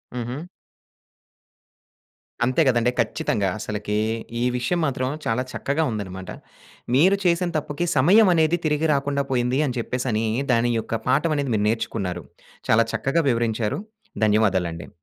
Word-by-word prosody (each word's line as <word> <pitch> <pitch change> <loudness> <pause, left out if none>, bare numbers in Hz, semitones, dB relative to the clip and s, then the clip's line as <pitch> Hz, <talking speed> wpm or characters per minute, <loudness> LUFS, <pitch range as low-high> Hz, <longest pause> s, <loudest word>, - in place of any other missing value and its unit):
హుహు. 125 +8 -5 2.0
అంతే 130 +6 +2
కదండీ. 120 -1 +3
ఖచ్చితంగా. 105 -3 0
అసలకి 105 0 -3 0.4
ఈ - - +1
విషయం 150 +9 -1
మాత్రం 130 -2 -1 0.2
చాలా 115 +3 0
చక్కగా 145 +3 -1
ఉందన్నమాట. 95 -3 -6 0.7
మీరు 185 +8 +5
చేసిన 175 0 +2
తప్పుకి 155 +3 -3
సమయం 190 +10 +6
అనేది 160 +1 +2
తిరిగి 155 +1 +1
రాకుండా 140 0 0
పోయింది 125 +2 +1
అని 125 -1 -3
చెప్పేసి 125 +2 -3
అని 110 +1 0 0.3
దాని 120 +1 +2
యొక్క 115 0 -4
పాఠం 155 +3 +2
అనేది 140 -3 -1
మీరు 105 0 +1
నేర్చుకున్నారు. 95 -6 -3 0.5
చాలా 115 +1 +5
చక్కగా 160 +5 +1
వివరించారు. 115 -2 -1 0.5
ధన్యవాదాలండి. 95 -6 +1
125 Hz, 130 wpm, -23 LUFS, 110-150 Hz, 2.0 s, సమయం